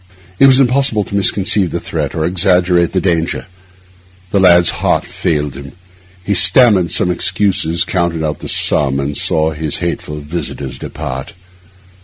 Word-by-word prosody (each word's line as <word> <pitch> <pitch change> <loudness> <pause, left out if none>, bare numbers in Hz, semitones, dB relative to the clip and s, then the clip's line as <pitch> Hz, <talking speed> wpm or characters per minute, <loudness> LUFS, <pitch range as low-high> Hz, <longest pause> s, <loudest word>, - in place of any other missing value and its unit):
It 135 - +7
was 135 0 +5
impossible 130 -4 +1
to 100 - -7
misconceive 100 -1 +2
the - - -4
threat - - -4
or 80 - -2
to - - 0
exaggerate 90 -1 +2
the 95 - 0
danger. 85 -3 -1 0.9
The 100 - +1
lad's 90 -2 +4
heart - - +1
failed 75 -3 -2
him. 70 0 -11 0.5
He 100 - -1
stammered 95 -2 +4
some 90 - +1
excuses, 90 -2 0
counted 85 -3 -2
out 75 - -4
the - - -7
sum, 70 -1 +1
and 70 +1 -3
saw 80 +2 0
his 75 -1 -2
hateful 85 -3 -4
visitors 75 -4 -6
depart. 65 +10 -6
85 Hz, 155 wpm, -14 LUFS, 80-95 Hz, 0.9 s, It